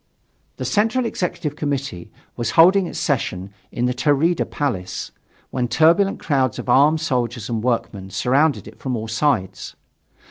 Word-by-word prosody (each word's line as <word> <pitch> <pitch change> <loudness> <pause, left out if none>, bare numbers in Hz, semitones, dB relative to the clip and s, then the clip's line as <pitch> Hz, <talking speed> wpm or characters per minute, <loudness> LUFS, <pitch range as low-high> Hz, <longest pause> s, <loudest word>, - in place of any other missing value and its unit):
The - - -4
Central 225 +4 +1
Executive 175 -8 -3
Committee 140 - -4 0.3
was 120 - -2
holding 185 +3 +6
its - - -7
session 100 - -2 0.2
in 120 - -1
the 125 - +1
Taurida 145 +6 +1
Palace, 110 -11 -3 0.4
when 125 -2 -1
turbulent 170 +9 +3
crowds 130 -6 0
of - - -6
armed 150 +5 +4
soldiers 120 -7 -2
and 115 -2 -2
workmen 110 -5 -2
surrounded 125 +4 +1
it - - -13
from 130 -2 -3
all 110 0 -5
sides. 110 -6 -1
135 Hz, 145 wpm, -21 LUFS, 115-160 Hz, 0.4 s, holding